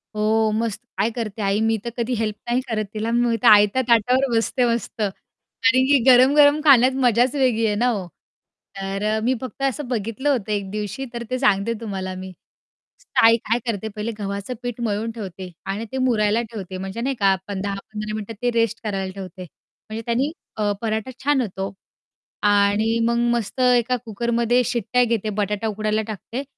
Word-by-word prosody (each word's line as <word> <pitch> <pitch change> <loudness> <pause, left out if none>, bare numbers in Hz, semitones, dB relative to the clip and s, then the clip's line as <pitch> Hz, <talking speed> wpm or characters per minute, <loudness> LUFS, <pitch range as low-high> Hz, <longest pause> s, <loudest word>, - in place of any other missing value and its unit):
हो 215 +1 +2
मस्त. 220 -1 -1 0.2
काय 200 +4 +2
करते 220 -2 -4
आई. 200 +1 +1
मी 225 0 +2
तर - - -1
कधी 240 +1 -1
हेल्प 215 -2 -1
नाही 245 +2 +2
करत 215 -2 -1
तिला. 220 +2 -2
मी 235 -1 +2
आयत्या 210 +4 +6
ताटावर 250 +3 +3
बसते 245 +2 +1
मस्त. 230 -1 -5
कारण 245 +5 -1
की 285 0 +5
गरम-गरम 285 +4 +6
खाण्यात 260 -3 +7
मजाच 245 +3 +3
वेगळी 250 -5 +2
आहे 210 -1 +1
ना 240 +4 +1
हो. 200 -6 -2 0.7
तर 200 +3 -1
मी 250 +3 +2
फक्त 260 +2 -8
असं 275 +1 -1
बघितलं 235 +3 -2
होतं 230 -7 0
एक 200 -2 -2
दिवशी 210 +5 -4
तर 235 0 -4
ते 255 - -1
सांगते 210 -2 +2
तुम्हाला 190 -4 -4
मी. 185 0 -7 0.9
आई 230 0 +7
काय 230 +2 +1
करते 220 -3 -2
पहिले 215 +2 -3
गव्हाचं 200 +3 -4
पीठ 245 -1 -4
मळून 220 0 -1
ठेवते 190 -4 -8
आणि 200 +4 -3
ते 265 - -3
मुरायला 230 -4 +2
ठेवते 190 -4 -6
म्हणजे 195 +4 -5
नाही 270 +2 -1
का 200 - +1
आपण 190 0 -1
10-15 210 +2 -5
मिनिटं 215 +1 -5
ते 245 0 +1
रेस्ट 230 -1 0
करायला 195 -3 -3
ठेवते. 185 -1 -8
म्हणजे 215 +5 -11
त्यांनी 250 +5 0 0.3
अ, 210 -1 +1
पराठा 220 +1 -2
छान 285 -1 +3
होतो 195 -4 -4 0.7
आणि 205 +2 +3
मग 235 0 +1 0.2
मस्त 235 0 -3
एका 250 0 +3
कुकरमध्ये 235 +2 +1
शिट्ट्या 245 +2 +1
घेते, 225 -3 0
बटाटा 210 +1 -1
उकडायला 215 0 -1
टाकते 225 +5 -5
225 Hz, 175 wpm, -22 LUFS, 205-245 Hz, 0.9 s, खाण्यात